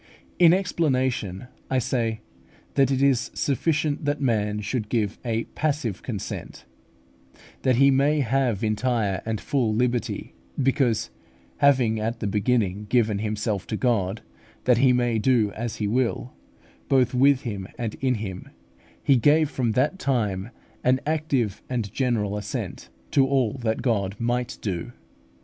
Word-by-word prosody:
In 170 -2 +8
explanation 130 - 0 0.2
I 130 - +1
say, 115 -3 -1 0.5
that 135 -2 +3
it 135 0 +1
is 135 -4 +2
sufficient 150 +2 0
that 145 0 0
man 105 -6 0
should 105 0 -3
give 110 -4 -1
a 115 -2 -1
passive 140 -9 -1
consent, 105 -7 -6 1.0
that 130 -2 +3
he 140 +3 +5
may 145 +3 +3
have 125 -4 0
entire 110 -3 0
and 110 -2 -1
full 120 -6 0
liberty; 120 +1 -1 0.3
because 130 -4 +1 0.5
having 125 -6 +3
at 115 +2 -2
the - - -3
beginning 105 -1 0
given 110 -5 +2
himself 105 -2 -2
to 110 - -2
God, 110 -5 0 0.4
that 125 -2 +4
He 130 0 +5
may 120 -2 +1
do 110 -3 +2
as 115 +2 -4
He 105 - -2
will 125 +2 -1 0.6
both 130 -2 +3
with 135 +1 +4
him 100 -5 -5
and 115 -3 -3
in 130 -2 +2
him, 95 -4 -6 0.5
he 140 -3 +4
gave 150 +5 +4
from 120 -4 0
that 145 - +1
time 105 - -1 0.3
an 130 +1 +3
active 145 -9 0
and 115 -5 -3
general 115 -6 0
assent 105 - -5 0.2
to 135 -1 +4
all 130 -5 +1
that 110 0 -1
God 100 -6 0
might 120 +1 -1
do. 95 +3 -3
120 Hz, 145 wpm, -25 LUFS, 110-135 Hz, 1.0 s, In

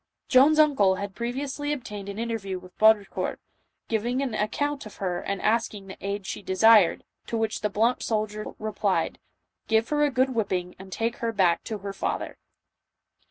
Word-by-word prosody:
Joan's 280 +3 +6
uncle 270 -12 +4
had 200 0 -5
previously 270 +5 -3
obtained 210 -8 -5
an 200 - -6
interview 225 -5 -3
with 180 0 -14
Baudricourt, 215 -2 +3 0.5
giving 240 +4 0
an 255 -5 -3
account 270 +5 -1
of 215 - -13
her 180 -3 -2
and 200 -1 -3
asking 215 -2 0
the 190 - -10
aid 200 0 -3
she - - -5
desired, 205 0 +5 0.2
to 230 - -2
which 220 -1 -1
the 210 - 0
blunt 225 +5 +1
soldier 215 -1 -2
replied, 210 -2 -1 0.2
" - - -51
Give 225 +1 +2
her 295 0 +2
a 295 - +4
good 260 0 +1
whipping 185 -6 -2
and 190 0 -11
take 230 +4 -2
her 230 -1 -1
back 180 -6 +2
to 220 - -4
her 200 0 -6
father." 195 - -3
215 Hz, 175 wpm, -26 LUFS, 200-240 Hz, 0.5 s, Joan's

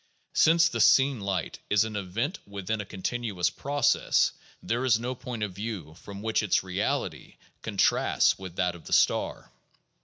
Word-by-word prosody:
Since 165 +1 +5
the 165 - -2
seen 135 -2 +5
light 100 -2 -3
is 105 0 +4
an 110 -1 -5
event 105 - -3
within 100 +2 -3
a - - -7
continuous 95 -3 -2
process, 140 +8 +2 0.3
there 120 +2 -1
is 120 -4 +3
no 125 +2 -3
point 120 -3 -6
of 100 -3 -3
view 100 -6 -6
from 100 +4 -10
which 110 0 +1
its 105 -3 +1
"reality" 95 +2 -3 0.3
contrasts - - +2
with 95 -2 -8
that 90 -1 0
of 85 - -13
the - - -4
star. - - +1
105 Hz, 160 wpm, -27 LUFS, 95-120 Hz, 0.3 s, Since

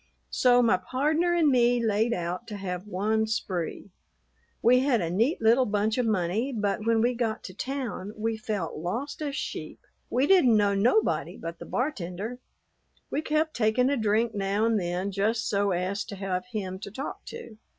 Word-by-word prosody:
So 245 -1 +4
my 220 -5 +4
pardner 305 - +1
and 325 -4 +4
me 245 -2 +4
layed 225 0 +1
out 180 +2 -3
to 210 -2 -6
have 185 0 -5
one 215 +3 0
spree. 190 -3 -3 0.7
We 250 +2 +6
had 260 -3 +2
a 170 -3 -2
neat 230 - +1
little 235 +3 +5
bunch 210 +3 0
of 245 - +1
money, 210 +5 0
but 210 -2 -1
when 230 -1 +3
we 240 +2 +2
got 230 -2 -2
to 185 - -8
town 250 -3 -4
we 225 +1 -1
felt 210 -6 -3
lost 230 - -4
as 285 -2 -2
sheep. - - -5 0.3
We 255 +3 +2
didn't 280 - +5
know 205 -1 +3
nobody 235 - +1
but 165 0 -7
the - - -9
bartender. 220 - -3 0.7
We 295 - 0
kept 310 0 0
taking 245 +3 +2
a - - +2
drink 220 0 +1
now 200 +2 0
and 225 -2 +2
then 180 +2 -2
just 215 +4 0
so 200 0 +1
as 190 +2 -1
to 200 - -7
have 190 0 -3
him 190 -5 -4
to 200 - -7
talk 265 +8 -6
to. 465 - -9
220 Hz, 180 wpm, -27 LUFS, 195-250 Hz, 0.7 s, We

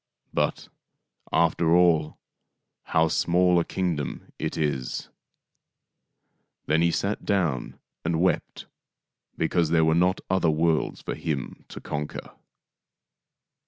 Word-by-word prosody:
But, - - -1 0.6
after 85 0 +3
all, 85 -4 +3 0.7
how 80 0 +3
small 90 +2 +3
a - - +1
kingdom 85 -8 -3
it - - -3
is! 75 -5 -2 0.7
" - - -52
Then 80 +2 +2
he 85 - +4
sat 100 +5 -1
down 85 - -1 0.2
and 85 -1 0
wept 95 +2 0 0.7
because 80 0 +1
there 80 -1 +4
were 80 - +3
not 90 +3 +2
other 95 -3 +2
worlds 80 +1 +1
for - - -3
him 70 -5 -4
to - - -9
conquer. 75 0 -5
80 Hz, 115 wpm, -26 LUFS, 80-90 Hz, 0.7 s, he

